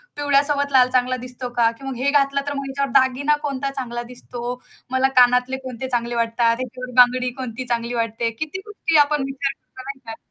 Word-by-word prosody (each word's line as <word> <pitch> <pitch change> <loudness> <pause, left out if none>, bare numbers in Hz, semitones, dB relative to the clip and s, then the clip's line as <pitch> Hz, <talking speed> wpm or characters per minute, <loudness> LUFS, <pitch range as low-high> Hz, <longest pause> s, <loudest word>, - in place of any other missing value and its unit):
पिवळ्यासोबत 285 0 +1
लाल 255 -1 +5
चांगला 255 0 +2
दिसतो 250 0 -6
का? 230 -1 +5
की 270 +4 -13
मग 270 - -4
हे 270 +3 +1
घातलं 280 -1 +2
तर 285 - -1
मग 275 - -3
ह्याच्यावर 275 0 -2
दागिना 265 +3 +2
कोणता 275 -1 -2
चांगला 240 -3 -4
दिसतो, 245 0 -7 0.3
मला 260 0 +3
कानातले 250 +1 +4
कोणते 260 0 -5
चांगले 240 -1 -1
वाटतात, 230 0 +2
ह्याच्यावर 255 0 -6
बांगडी 250 +1 +3
कोणती 255 -1 -5
चांगली 235 0 -1
वाटते, 230 0 -1
किती 310 +4 -4
गोष्टी 335 -6 0
आपण 295 -2 0
विचार 270 0 -2
करतो 260 - -14
नाही 275 -1 -6
का 225 - -6
यात. 225 - -8
255 Hz, 200 wpm, -22 LUFS, 245-275 Hz, 0.3 s, लाल